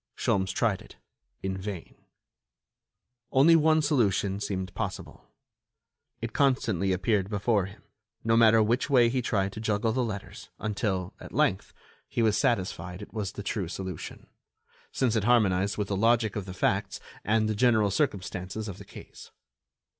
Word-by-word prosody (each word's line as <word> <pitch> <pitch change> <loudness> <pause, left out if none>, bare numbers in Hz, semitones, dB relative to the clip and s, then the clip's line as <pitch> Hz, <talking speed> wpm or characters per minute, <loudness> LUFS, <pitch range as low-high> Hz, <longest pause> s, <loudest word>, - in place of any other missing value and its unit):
Sholmes 95 -1 +1
tried 100 0 0
it, - - -15 0.5
in 95 0 -2
vain. 95 -2 -6 1.4
Only 145 +5 +6
one 155 0 +4
solution 100 - +1
seemed 95 -3 -4
possible; 100 -5 -6 0.9
it 115 -1 -4
constantly 110 -9 +1
appeared 95 +1 +1
before 105 -1 +1
him, 100 - -15 0.4
no 115 0 +2
matter 115 -1 +6
which 120 +6 0
way 125 -4 +5
he 130 +1 0
tried 100 -4 -1
to - - -7
juggle 110 0 0
the 125 +2 0
letters, 105 -4 -6
until, 100 -4 -2
at - - -10
length, - - +1 0.4
he 115 - -1
was 110 -2 +3
satisfied 90 -4 -1
it - - -13
was 105 -5 -3
the - - -7
true - - -2
solution, 95 -4 -7 0.7
since 125 -4 0
it 105 -2 +1
harmonized 100 -4 +3
with 105 -2 -2
the 100 - 0
logic 115 +1 +2
of 105 -3 -3
the 95 - -7
facts 100 +2 0 0.2
and 110 0 +2
the 110 - 0
general 110 -2 +3
circumstances 100 -3 -2
of 95 - -7
the - - -11
case. - - -12
105 Hz, 155 wpm, -28 LUFS, 95-115 Hz, 1.4 s, Only